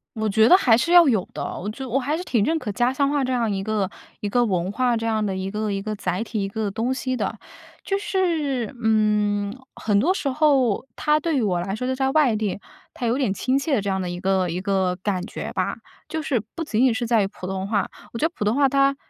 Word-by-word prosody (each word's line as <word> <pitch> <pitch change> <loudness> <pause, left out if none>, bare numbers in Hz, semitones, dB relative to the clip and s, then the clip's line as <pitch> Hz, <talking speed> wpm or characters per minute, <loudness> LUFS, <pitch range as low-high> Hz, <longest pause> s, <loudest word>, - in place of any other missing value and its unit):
我 220 0 -1
觉 220 +2 +4
得 365 - +9
还 235 -11 +4
是 335 +8 0
要 350 -3 +8
有 215 -8 +2
的， - - -5 0.2
我 200 - -4
就 260 +5 -6
我 250 - +1
还 285 +4 0
是 360 - -5
挺 230 - +1
认 320 +6 +1
可 240 - -5
家 245 +3 +2
乡 280 +1 +1
话 285 -2 +1
这 260 - -1
样 235 -3 +1
一 195 -1 -2
个 210 -3 -1 0.3
一 210 - -3
个 245 +4 +2
文 185 -4 0
化， 245 +3 +1
这 225 - -3
样 220 -1 0
的 195 -2 -2
一 190 +1 -3
个 210 0 -2
一 195 0 -2
个 215 +1 -4
载 180 -1 -2
体， 220 -3 -3
一 195 - -2
个 215 0 -2
东 230 +6 -1
西 255 0 -2
的。 - - -2 0.5
就 390 - 0
是， 320 - -1
嗯， 210 -1 +1 0.2
很 210 -2 +1
多 360 +7 +3
时 300 - -3
候 270 -6 +2
它 300 0 +3
对 310 -2 0
于 - - +2
我 180 -5 0
来 195 +2 -3
说， 250 +4 -3
就 260 - 0
在 265 0 +1
外 275 -7 +3
地， 210 -2 -2 0.3
它 245 - -4
有 240 +3 +1
点 250 -9 +1
亲 260 +6 0
切 280 +1 -1
的 215 - +2
这 200 - -2
样 190 0 0
的 180 - -3
一 175 - -5
个 190 -1 +1
一 175 +2 -2
个 190 -2 0
感 190 -3 -1
觉 - - -6
吧， - - -1 0.3
就 315 - -2
是 260 -8 0
不 330 - -3
仅 230 -2 +1
仅 250 -3 +4
是 235 +1 -2
在 225 -3 +3
于 - - 0
普 185 -2 -9
通 190 0 -3
话， 205 -1 0 0.2
我 230 - -6
觉 320 - +3
得 340 - -15
普 210 - -2
通 210 - +2
话 280 -1 +4
它 275 0 +3
225 Hz, 290 characters per minute, -23 LUFS, 200-270 Hz, 0.5 s, 得